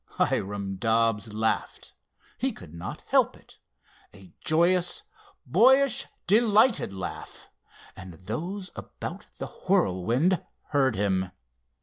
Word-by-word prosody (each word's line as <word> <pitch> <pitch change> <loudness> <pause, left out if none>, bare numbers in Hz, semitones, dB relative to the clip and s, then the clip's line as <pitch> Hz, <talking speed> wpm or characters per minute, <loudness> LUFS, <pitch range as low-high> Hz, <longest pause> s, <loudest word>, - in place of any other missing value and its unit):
Hiram 100 -1 -1
Dobbs 115 0 +1
laughed, 110 +1 -2 0.5
he - - 0
could 75 - -12
not 85 +3 -7
help - - +3
it—a 95 -4 -21
joyous, 175 +3 +2 0.4
boyish, 255 - +4 0.2
delighted 220 - +4
laugh, 95 -2 -7 0.4
and 95 -3 -10
those 175 - -5
about - - -7
the - - -4 0.2
Whirlwind 120 - +2 0.3
heard 135 -5 +2
him. 95 -2 0
115 Hz, 95 wpm, -27 LUFS, -, 0.5 s, boyish